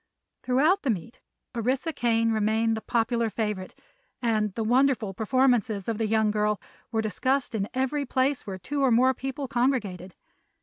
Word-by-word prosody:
Throughout 305 Hz, +10 st, +3 dB
the 275 Hz, -, -2 dB
meet 225 Hz, +2 st, -3 dB, 0.3 s
Orissa 255 Hz, +7 st, -1 dB
Kane 230 Hz, -3 st, +1 dB
remained 220 Hz, +1 st, +1 dB
the 220 Hz, -, -5 dB
popular 230 Hz, 0 st, 0 dB
favorite 210 Hz, -3 st, -3 dB, 0.4 s
and 215 Hz, -3 st, +1 dB
the 225 Hz, -, -1 dB
wonderful 245 Hz, -3 st, +2 dB
performances 225 Hz, -2 st, +1 dB
of 225 Hz, -1 st, -2 dB
the 225 Hz, -, +1 dB
young 220 Hz, 0 st, +2 dB
girl 210 Hz, 0 st, 0 dB, 0.3 s
were 220 Hz, -1 st, 0 dB
discussed 255 Hz, +6 st, 0 dB
in 205 Hz, -2 st, -2 dB
every 265 Hz, +2 st, -1 dB
place 260 Hz, -1 st, 0 dB
where 190 Hz, -1 st, -4 dB
two 280 Hz, +11 st, -3 dB
or 270 Hz, -, +4 dB
more 250 Hz, +3 st, +4 dB
people 270 Hz, +2 st, -5 dB
congregated. 225 Hz, -8 st, -1 dB
230 Hz, 160 wpm, -26 LUFS, 215-260 Hz, 0.4 s, or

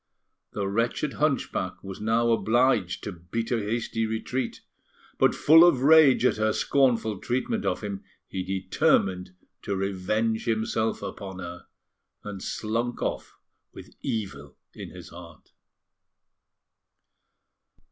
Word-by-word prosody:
The 100 Hz, -2 st, -2 dB
wretched 115 Hz, +8 st, -1 dB
hunchback 135 Hz, -10 st, -1 dB
was 95 Hz, 0 st, -8 dB
now 115 Hz, +2 st, +2 dB
obliged 115 Hz, -5 st, +2 dB
to 105 Hz, -, -4 dB
beat 90 Hz, +6 st, -5 dB
a 120 Hz, -, +2 dB
hasty 115 Hz, +1 st, -2 dB
retreat; 115 Hz, +3 st, -3 dB, 0.6 s
but, -, -, +4 dB
full 160 Hz, +3 st, +7 dB
of 145 Hz, -8 st, +4 dB
rage 150 Hz, -4 st, +6 dB
at -, -, +3 dB
her 110 Hz, 0 st, +1 dB
scornful 120 Hz, -7 st, +1 dB
treatment 215 Hz, -, -2 dB
of -, -, -1 dB
him, 100 Hz, -2 st, -5 dB, 0.2 s
he 95 Hz, -, -4 dB
determined 90 Hz, -1 st, 0 dB, 0.3 s
to 100 Hz, -, -3 dB
revenge 100 Hz, +4 st, -1 dB
himself 110 Hz, -1 st, -1 dB
upon 95 Hz, -2 st, -7 dB
her, 85 Hz, -2 st, -8 dB, 0.6 s
and 100 Hz, -2 st, -7 dB
slunk 115 Hz, +3 st, -2 dB
off -, -, -4 dB, 0.4 s
with -, -, -12 dB
evil 75 Hz, -11 st, -4 dB, 0.2 s
in -, -, -8 dB
his 90 Hz, -2 st, -11 dB
heart. 85 Hz, -1 st, -13 dB
110 Hz, 120 wpm, -26 LUFS, 95-120 Hz, 0.6 s, full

